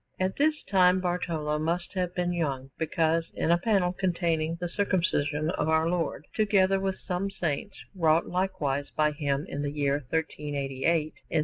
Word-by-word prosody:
At 185 0 0
this 305 +1 +2
time 185 -1 +4
Bartolo 170 -4 -1
must 170 +3 -2
have 180 -2 -2
been 175 0 0
young, 135 -6 -2
because 165 0 +1
in 165 - +1
a 170 - +4
panel 190 -3 +2
containing 170 -4 0
the 175 +1 -3
Circumcision 170 -5 0
of 160 - -1
Our 160 0 +3
Lord, 175 -1 -1
together 195 -3 +3
with 190 -1 -1
some 185 +1 -2
saints, 175 0 -3 0.2
wrought 165 -3 +3
likewise 175 -7 -1
by 150 0 +3
him 145 -1 -1
in 145 - -4
the 145 - -1
year 140 -1 +1
1388 150 0 -1 0.2
in - - 0
S. - - +5
170 Hz, 170 wpm, -28 LUFS, 150-185 Hz, 0.2 s, S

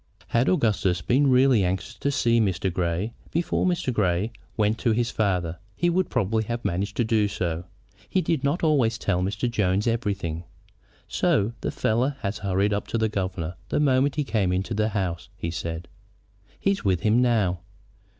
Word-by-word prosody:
Had 120 +3 +2
Augustus 105 - +2
been 135 - +3
really 130 -4 +5
anxious 90 0 -2
to 140 - 0
see 115 -4 +2
Mr. 95 -3 0
Grey 90 +5 -1 0.2
before 170 +2 0
Mr. 175 -8 0
Grey 95 0 +1 0.3
went 110 0 +1
to 115 - +2
his 120 +1 0
father, 90 -5 0 0.2
he 175 +7 +1
would 185 +2 +1
probably 110 -2 +1
have 120 +2 -4
managed 100 +4 -2
to 120 - +3
do 110 -2 +2
so. 90 -4 -3 0.4
He 190 - +2
did 165 -6 0
not 145 +6 0
always 140 -8 +3
tell 90 - 0
Mr. 100 +6 -1
Jones 105 -3 +1
everything. 100 -8 -1 0.6
"So 105 +3 +1
the - - -1
fellow 125 +6 0
has 100 0 -3
hurried 100 +1 +1
up 100 - -2
to - - -1
the 110 -1 +1
governor 95 -4 -3
the - - +1
moment 135 -1 +3
he 150 - +1
came 105 -7 0
into 95 +5 -1
the 110 +1 +1
house," 95 -3 -3
he 85 - -3
said. 85 0 -4 0.7
"He's 195 0 0
with 95 -4 +1
him 110 +3 +3
now." 105 -8 +2
105 Hz, 180 wpm, -25 LUFS, 95-120 Hz, 0.7 s, really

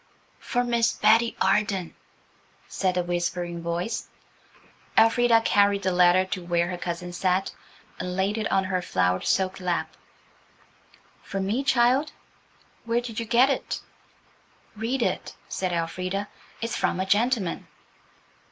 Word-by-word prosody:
"For 245 -1 -1
Miss 235 -1 +1
Betty 225 +2 +3
Arden," 195 -2 +1 0.7
said 185 -2 -1
a 180 - +1
whispering 175 0 -2
voice. 170 +6 -3 0.9
Elfrida 230 +1 +5
carried 200 -2 +3
the 185 - +1
letter 180 +1 +4
to 185 -1 -4
where 175 0 0
her 180 - -4
cousin 175 0 -5
sat, 185 +1 0 0.5
and 180 0 -4
laid 195 +3 0
it 220 - -2
on 195 0 +3
her 185 -1 -1
flowered 90 - 0
silk 190 0 +1
lap. 180 -2 -2 1.3
"For 195 - -5
me, 210 +8 -1
child? 265 +3 +2 0.7
Where 230 +1 +1
did 235 -2 -5
you 230 - -4
get 250 +4 +4
it?" - - -3 1.0
"Read 235 +4 -1
it," - - -2
said 185 -1 -2
Elfrida, 185 +4 -2 0.3
"it's 230 0 -2
from - - 0
a 190 - 0
gentleman." 210 -2 0
195 Hz, 135 wpm, -25 LUFS, 180-230 Hz, 1.3 s, Elfrida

